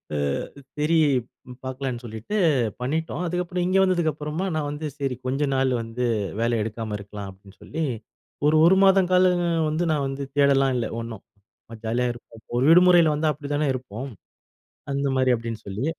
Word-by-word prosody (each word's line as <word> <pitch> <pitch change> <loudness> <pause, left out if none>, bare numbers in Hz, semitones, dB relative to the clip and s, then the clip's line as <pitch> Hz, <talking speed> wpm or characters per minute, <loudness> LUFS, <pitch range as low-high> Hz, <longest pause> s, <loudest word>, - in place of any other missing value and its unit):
அ - - 0 0.6
சரி 150 +3 +1 0.7
பார்க்கலான்னு 130 -2 -4
சொல்லிட்டு 110 - -5 0.4
பண்ணிட்டோம். 160 +6 -2
அதுக்கப்புறம் 180 +1 -2
இங்க 185 - +2
வந்ததுக்கு 175 -4 +2
அப்புறமா 150 +5 -4
நான் 150 -2 -1
வந்து 150 +1 -4
சரி 135 -3 -2
கொஞ்ச 135 +3 0
நாள் 130 0 +2
வந்து 115 +2 -4 0.4
வேலை 115 +1 +1
எடுக்காம 110 0 -4
இருக்கலாம் 100 0 -8
அப்டின்னு 95 +1 -16
சொல்லி 160 +2 -4 0.6
ஒரு 155 - +4
1 185 - +6
மாதம் 190 -1 +5
காலம் 180 -1 +4 0.3
வந்து 155 +3 -1
நான் 145 -3 0
வந்து 135 +1 -4
தேடலாம் 135 -2 +4
இல்ல 120 -2 0
ஒண்ணும், 115 -3 -7 0.6
ஜாலியா 120 +3 0
இருப்போம் 115 -1 -15 0.2
ஒரு 125 - +2
விடுமுறையில 175 -2 +6
வந்தா 155 0 +1
அப்டிதானே 145 0 -2
இருப்போம். 125 +1 -6 0.8
அந்த 140 0 0
மாரி 130 -1 +3
அப்டின்னு 115 -1 -6
சொல்லி. 100 +6 -4
140 Hz, 155 wpm, -24 LUFS, 120-160 Hz, 0.8 s, 1